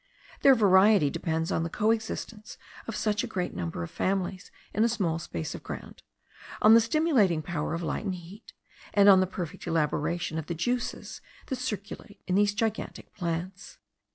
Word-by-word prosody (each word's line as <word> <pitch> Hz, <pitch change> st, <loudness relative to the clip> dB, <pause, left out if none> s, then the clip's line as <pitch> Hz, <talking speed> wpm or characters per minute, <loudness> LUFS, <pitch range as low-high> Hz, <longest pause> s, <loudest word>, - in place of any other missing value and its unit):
Their 270 Hz, -1 st, +7 dB
variety 195 Hz, -, +5 dB
depends 160 Hz, +1 st, -2 dB
on -, -, 0 dB
the 165 Hz, -, -2 dB
coexistence 220 Hz, +1 st, -2 dB, 0.3 s
of 230 Hz, -, -4 dB
such 210 Hz, +1 st, 0 dB
a -, -, -3 dB
great 185 Hz, -5 st, -3 dB
number 85 Hz, -1 st, -4 dB
of 85 Hz, -, -7 dB
families 190 Hz, -1 st, -2 dB, 0.2 s
in 215 Hz, -, +2 dB
a 235 Hz, -, +3 dB
small 180 Hz, -8 st, -1 dB
space 85 Hz, -, -5 dB
of -, -, -8 dB
ground, -, -, -8 dB, 0.6 s
on 215 Hz, -, +7 dB
the 230 Hz, -, +8 dB
stimulating 230 Hz, -, +2 dB
power 160 Hz, -1 st, -3 dB
of 170 Hz, -, -4 dB
light 190 Hz, -, -3 dB
and 190 Hz, -2 st, -1 dB
heat, 180 Hz, +6 st, -12 dB, 0.4 s
and 200 Hz, -1 st, +6 dB
on 195 Hz, -2 st, +8 dB
the 185 Hz, -, +2 dB
perfect 175 Hz, -4 st, -6 dB
elaboration 165 Hz, +1 st, -1 dB
of 160 Hz, -, -7 dB
the 170 Hz, -, -3 dB
juices 245 Hz, +9 st, -3 dB, 0.2 s
that 265 Hz, -, -3 dB
circulate 210 Hz, -3 st, -6 dB
in 180 Hz, -, -2 dB
these 205 Hz, +1 st, +3 dB
gigantic 220 Hz, 0 st, -3 dB
plants. 175 Hz, +1 st, -5 dB
190 Hz, 175 wpm, -28 LUFS, 165-220 Hz, 0.6 s, the